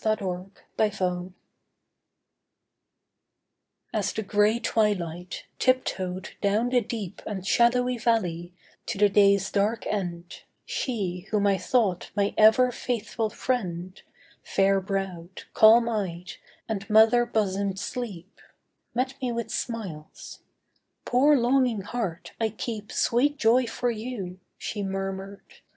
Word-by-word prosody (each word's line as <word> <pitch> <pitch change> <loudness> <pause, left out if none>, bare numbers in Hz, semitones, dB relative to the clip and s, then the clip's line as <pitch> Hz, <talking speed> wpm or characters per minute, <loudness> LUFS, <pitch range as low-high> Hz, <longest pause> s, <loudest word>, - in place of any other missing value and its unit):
SLEEP'S 200 0 -2
TREACHERY 180 -1 -2 2.6
As 205 -3 0
the 220 - -3
grey 210 +2 +3
twilight, 180 -6 -1
tiptoed 190 -8 0
down 210 +4 +2
the 250 -1 +3
deep 210 -4 -6
And 190 -3 -5
shadowy 245 +3 +3
valley, 180 -7 0 0.4
to 220 - -3
the 205 0 +5
day's 200 -1 +4
dark 210 +3 0
end, 175 -4 -4 0.2
She 195 -7 -3
whom 210 -2 +1
I 195 -2 +3
thought 210 -8 +1
my 200 -1 +1
ever 220 +4 +6
faithful 230 -2 -2
friend, 185 -7 -3 0.4
Fair 195 0 +2
browed, 190 -2 -4
calm 230 +2 +7
eyed 185 -6 -3 0.4
and 200 -3 -4
mother 220 +3 +6
bosomed 200 -3 -1
Sleep, 200 -4 -6 0.5
Met 255 +2 0
me 250 -2 -1
with 235 -1 -4
smiles. 190 - -6 0.7
'Poor 280 +4 +4
longing 245 -3 +2
heart, 195 -5 -4
I 220 - +2
keep 215 -1 -6
Sweet 285 +5 +2
joy 240 +1 +3
for 245 +1 -1
you,' 215 -5 -6 0.2
she 210 - -4
murmured. 195 0 -5
210 Hz, 115 wpm, -26 LUFS, 190-235 Hz, 2.6 s, calm